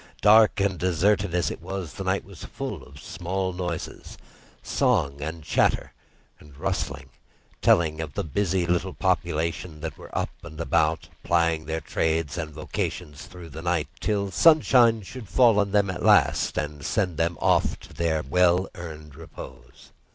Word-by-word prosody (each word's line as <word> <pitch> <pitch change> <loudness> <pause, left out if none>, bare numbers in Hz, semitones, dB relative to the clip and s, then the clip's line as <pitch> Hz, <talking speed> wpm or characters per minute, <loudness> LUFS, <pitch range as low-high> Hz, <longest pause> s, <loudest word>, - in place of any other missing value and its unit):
Dark 110 0 +6
and 95 -2 0
deserted 95 +1 +1
as 85 -5 +1
it - - -8
was, 95 -5 -5
the - - -6
night - - 0
was - - -12
full - - -6
of 70 0 -14
small 95 +4 -3
noises, 90 -2 -5 0.5
song 85 - +1
and 80 +2 -5
chatter - - +1 0.5
and 75 -2 -16
rustling, 70 -7 -3 0.5
telling 80 -2 +3
of 75 -4 -7
the - - -1
busy 90 +3 0
little 90 +2 -1
population 85 -2 -1
who 80 +1 -4
were - - -9
up - - -1
and 80 - -11
about, 80 +1 +1
plying 85 -2 +1
their 80 0 -2
trades 80 -3 -1
and 80 -2 -4
vocations 75 -1 -5
through 90 -3 -11
the 80 +2 -8
night 85 -3 0
till 100 -2 -1
sunshine 120 - +5
should 110 0 -9
fall 115 +1 +5
on 100 -1 +1
them 100 -1 +2
at 90 - -6
last - - +3
and 75 -1 -3
send 90 -7 -1
them 85 +1 0
off - - +2
to - - -14
their 80 -2 0
well 90 +4 +3
earned 75 -4 -9
repose. 65 -5 -12
85 Hz, 160 wpm, -25 LUFS, 80-95 Hz, 0.5 s, Dark